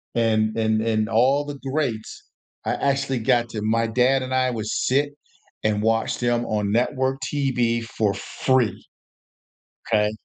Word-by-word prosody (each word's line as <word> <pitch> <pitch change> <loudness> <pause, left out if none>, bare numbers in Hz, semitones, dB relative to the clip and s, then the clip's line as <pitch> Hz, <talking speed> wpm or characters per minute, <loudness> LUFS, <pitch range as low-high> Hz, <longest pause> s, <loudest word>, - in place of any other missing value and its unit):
and 110 -2 +2
and 110 -1 +1
and 110 -1 0
all 130 +6 +3
the 145 -1 -6
greats 130 -8 -3 0.4
I - - 0
actually 135 -2 0
got 120 0 +2
to 110 -2 -5
my 115 +1 +1
dad 125 +4 +2
and 130 0 -4
I 130 0 +2
would 110 -3 -4
sit 140 +6 +1 0.5
and 105 -1 +1
watch 115 +1 +1
them 120 -1 +1
on 105 -2 -1
network 130 +3 0
TV 125 -5 +1
for 110 -3 -1
free. 125 +1 0 1.1
'Kay? 105 -2 +2
115 Hz, 145 wpm, -23 LUFS, 110-130 Hz, 1.1 s, all